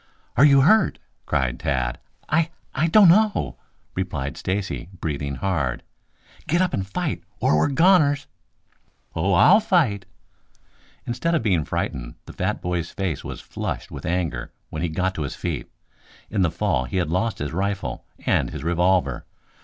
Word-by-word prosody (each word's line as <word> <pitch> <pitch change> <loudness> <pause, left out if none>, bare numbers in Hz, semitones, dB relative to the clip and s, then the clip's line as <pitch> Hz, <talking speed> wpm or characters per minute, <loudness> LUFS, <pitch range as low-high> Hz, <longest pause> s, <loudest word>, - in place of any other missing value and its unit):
"Are 140 - +7
you 140 -2 +6
hurt?" 190 +7 +4 0.3
cried 65 -2 0
Tad. 65 -2 -1 0.3
"I 160 +1 +2 0.2
I 155 +5 +1
don't 195 +4 +7
know," 210 +3 +3 0.3
replied 75 -8 -3
Stacy, 95 -2 -3
breathing 70 -4 -3
hard. 70 -6 -1 0.6
"Get 170 - +2
up 185 -1 +1
and 95 0 -2
fight, 95 - -2 0.2
or - - +3
we're 75 - +3
goners!" 145 -2 +4 0.9
"Oh, 95 +4 +1
I'll 185 - +7
fight!" 140 - +1 1.0
Instead 145 +8 0
of 155 - 0
being 90 -8 +2
frightened, - - -3
the - - -10
fat - - -2
boy's 85 -2 -2
face 95 -7 -3
was - - -7
flushed - - -5
with - - -7
anger 85 -9 -2 0.2
when 80 - -4
he 85 - 0
got 90 +4 -1
to 80 - -5
his 70 - -3
feet. 85 -7 -4 0.6
In 105 -3 +1
the 90 - +3
fall 80 -8 0
he 65 - -3
had 85 -4 0
lost 110 +6 0
his 75 +1 -4
rifle 100 +2 -2 0.2
and - - +2
his - - -7
revolver. 90 +2 +1
95 Hz, 160 wpm, -23 LUFS, -, 1.0 s, Are